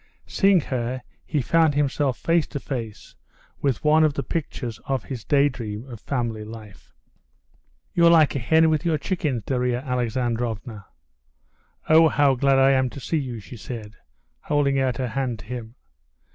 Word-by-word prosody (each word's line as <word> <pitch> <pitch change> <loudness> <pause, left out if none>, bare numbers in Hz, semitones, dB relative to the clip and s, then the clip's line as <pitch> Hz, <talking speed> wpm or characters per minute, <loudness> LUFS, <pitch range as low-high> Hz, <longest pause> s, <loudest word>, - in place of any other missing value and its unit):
Seeing 195 -3 +3
her, 125 -1 -3 0.2
he 150 -5 0
found 160 +2 +3
himself 140 -2 0
face 165 -1 +1
to 145 - -5
face 115 -6 -6 0.5
with 135 -4 0
one 155 +1 +5
of 150 -2 +2
the - - -2
pictures 125 -7 -4
of 135 -2 -1
his 125 -5 -7
daydream 125 -6 0
of 120 -4 -9
family 115 -3 -3
life. 105 -4 -12 1.0
"You're 170 -1 +5
like 160 -4 +5
a - - 0
hen 160 +6 +4
with 155 0 0
your 165 -3 +1
chickens, 145 - -2
Darya 125 0 0
Alexandrovna." 120 -4 -3 1.0
"Ah, 160 +1 +7
how 145 -3 +3
glad 135 +1 +2
I 135 0 +5
am 130 -1 +2
to 140 - -9
see 160 +4 -1
you!" 125 -5 -5
she 115 +4 -11
said, 110 -1 -8 0.5
holding 140 -2 +1
out 130 -3 0
her 130 -2 -2
hand 130 -1 -2
to 105 - -13
him. 120 0 -7
130 Hz, 160 wpm, -24 LUFS, 120-145 Hz, 1.0 s, Ah